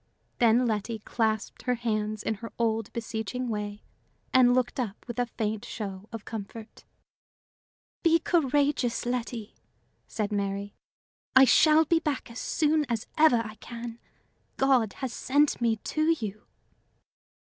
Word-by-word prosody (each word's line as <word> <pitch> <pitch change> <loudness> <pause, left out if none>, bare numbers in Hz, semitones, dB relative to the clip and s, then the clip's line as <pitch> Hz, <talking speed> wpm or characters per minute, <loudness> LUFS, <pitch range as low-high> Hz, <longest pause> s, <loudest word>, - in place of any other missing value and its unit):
Then 240 +1 +5
Letty 220 0 -1
clasped 220 0 -2
her 250 - +3
hands 215 -2 -2
in - - 0
her 230 - -7
old, 225 -2 0
beseeching 230 +2 -4
way, 210 -1 -4 0.5
and 250 -1 +6
looked 255 0 0
up 220 -5 -4
with 235 0 -5
a 245 - +1
faint 215 -2 -3
show 200 -2 -6
of 225 -2 -7
comfort. 220 +1 -8 1.2
"Be 330 -1 +5
courageous, 285 -7 +1
Letty," 240 -3 -3 0.5
said 215 -1 -3
Mary. 200 0 -2 0.6
"I 265 0 +9
shall 310 +4 +6
be 330 +2 +3
back 290 -6 -3
as 235 - -7
soon 310 -1 +1
as 230 -2 -1
ever 300 -7 +5
I 215 - -7
can. 235 +1 -8 0.6
God 260 -6 +3
has 260 -3 -5
sent 285 0 +2
me 230 -1 +3
to 310 +8 -2
you." 215 -2 -6
235 Hz, 135 wpm, -28 LUFS, 215-255 Hz, 1.2 s, I